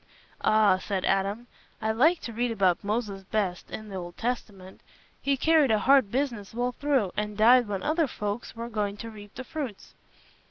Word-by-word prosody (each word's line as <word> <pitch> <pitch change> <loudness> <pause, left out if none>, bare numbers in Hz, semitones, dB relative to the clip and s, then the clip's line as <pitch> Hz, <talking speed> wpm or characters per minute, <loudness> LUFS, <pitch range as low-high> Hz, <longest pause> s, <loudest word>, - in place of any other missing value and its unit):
"Ah," 215 -3 +4
said 190 -1 -2
Adam, 200 +4 0 0.3
"I 220 0 0
like 315 +10 +3
to 230 - -6
read 240 +2 0
about 195 -6 +1
Moses 205 -2 -2
best, 190 -3 -2
in 215 -1 -7
th' - - -8
Old 175 -2 -6
Testament. 205 -6 -5 0.4
He 275 -1 +1
carried 315 -1 +4
a 220 - +4
hard 260 +1 +4
business 235 -5 -2
well 245 +1 0
through, 260 -7 0
and 210 -1 -3
died 240 +2 +6
when 200 -2 -3
other 315 0 +1
folks 210 0 -5
were 230 +1 -5
going 210 -3 -2
to 230 +1 -7
reap 205 -2 -13
the 260 - -6
fruits. 260 -6 -6
220 Hz, 185 wpm, -27 LUFS, 200-250 Hz, 0.4 s, died